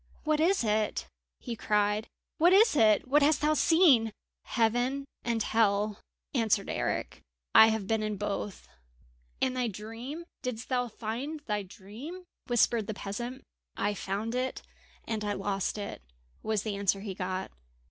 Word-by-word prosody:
"What 305 -1 +1
is 355 0 +3
it?" 215 -1 0 0.3
he 240 -3 -5
cried. 210 0 +1 0.3
"What 345 +3 +6
is 425 -2 +6
it? 215 -3 +4
What 290 +3 +4
hast 295 +1 +4
thou 300 +1 +3
seen?" 300 -8 +5 0.3
"Heaven 245 +4 +1 0.2
and 230 -2 0
Hell," 210 -1 +1 0.3
answered 220 -5 +1
Eric. - - -2 0.3
"I 220 - +9
have 220 -2 0
been 220 +2 0
in 215 -1 -2
both!" 205 0 -4 0.8
"And 255 -1 +1
thy 250 -1 0
dream 225 - -7 0.2
didst 250 -3 -5
thou 250 -2 +1
find 245 +8 -5
thy 210 -7 -2
dream?" 220 - -9 0.2
whispered 235 -3 +2
the 215 - -3
peasant. 240 +7 -5 0.3
"I 205 +1 +1
found 205 +3 -3
it 255 +1 -2 0.4
and 220 -2 -2
I 205 0 -1
lost 195 0 -2
it," 205 -1 -5 0.4
was 215 -2 -1
the 215 -2 -2
answer 195 0 +1
he 200 -2 -5
got. 185 0 -3
225 Hz, 150 wpm, -30 LUFS, 210-255 Hz, 0.8 s, I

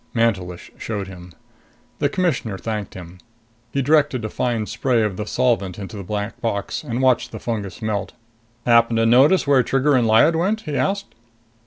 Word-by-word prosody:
Mantelish 95 -7 -1
showed 105 -3 -4
him. 90 -1 -11 0.7
The 145 - +2
Commissioner 155 - -1
thanked 105 -1 -5
him. 90 0 -10 0.5
He 140 - 0
directed 145 -4 +2
a - - -3
fine 115 -3 -1
spray 115 +2 0
of 105 -3 -1
the 105 +2 -5
solvent 105 -8 0
into 100 -1 -7
the 100 - -5
black 105 +3 -4
box 100 0 -2
and 125 -2 -2
watched 130 -2 +2
the - - -7
fungus 110 -2 -4
melt. 105 -2 -2 0.5
"Happen 115 -1 +4
to 115 0 +2
notice 135 +10 +5
where 140 -2 +4
Trigger 135 +4 +1
and 125 -4 +3
Lyad 115 +9 +5
went?" 200 +7 0
he 150 -6 -5
asked. 200 +6 -1
115 Hz, 175 wpm, -21 LUFS, 105-135 Hz, 0.7 s, notice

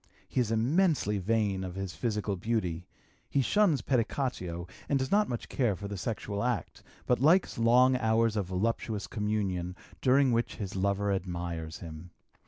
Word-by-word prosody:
He - - -1
is 120 -4 +1
immensely 120 - +2
vain 100 -1 0
of 90 -1 -6
his 95 -2 -4
physical 105 +1 -1
beauty; 90 -4 -2 0.4
he 140 - +2
shuns 170 - +3
pedicatio 115 -9 -1 0.2
and 140 - +3
does 130 -1 -2
not 210 +1 +3
much 120 -2 -4
care 120 -7 +1
for 100 +2 -6
the 100 - -5
sexual 100 0 -3
act, 120 -4 -2 0.2
but 125 - +2
likes 160 +1 +3
long 125 +3 +5
hours 115 -2 +2
of 100 -4 -1
voluptuous 105 +2 -1
communion 100 -4 -2 0.3
during 135 0 +4
which 120 0 0
his 100 -3 -5
lover 100 +1 +1
admires 85 -3 -4
him. 80 +1 -9
105 Hz, 160 wpm, -30 LUFS, 95-125 Hz, 0.4 s, long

